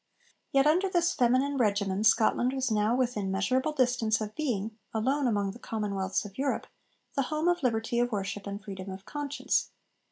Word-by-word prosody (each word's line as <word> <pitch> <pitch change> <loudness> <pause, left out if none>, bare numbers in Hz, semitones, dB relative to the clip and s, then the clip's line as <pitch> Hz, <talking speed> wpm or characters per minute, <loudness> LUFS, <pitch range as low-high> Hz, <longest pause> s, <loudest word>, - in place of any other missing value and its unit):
Yet 275 0 +4
under 355 +6 +3
this 350 -1 +2
feminine 260 +3 +2
'regimen' 200 -4 +1
Scotland 230 +3 +3
was 265 -3 -1
now 215 +2 +2
within 240 -6 0
measurable 255 +10 +1
distance 250 -5 +2
of 215 -1 -4
being, 225 -8 -2 0.2
alone 265 +5 +1
among 205 -4 0
the 235 - -12
commonwealths 200 -4 -2
of 205 +3 -10
Europe, 275 0 0 0.5
the 275 - +1
home 310 +2 0
of 350 0 +2
liberty 235 -2 0
of 245 0 +1
worship 200 -1 -3
and 200 0 -4
freedom 195 -2 -8
of 190 +1 -8
conscience. 290 -1 -1
235 Hz, 170 wpm, -29 LUFS, 205-270 Hz, 0.5 s, Yet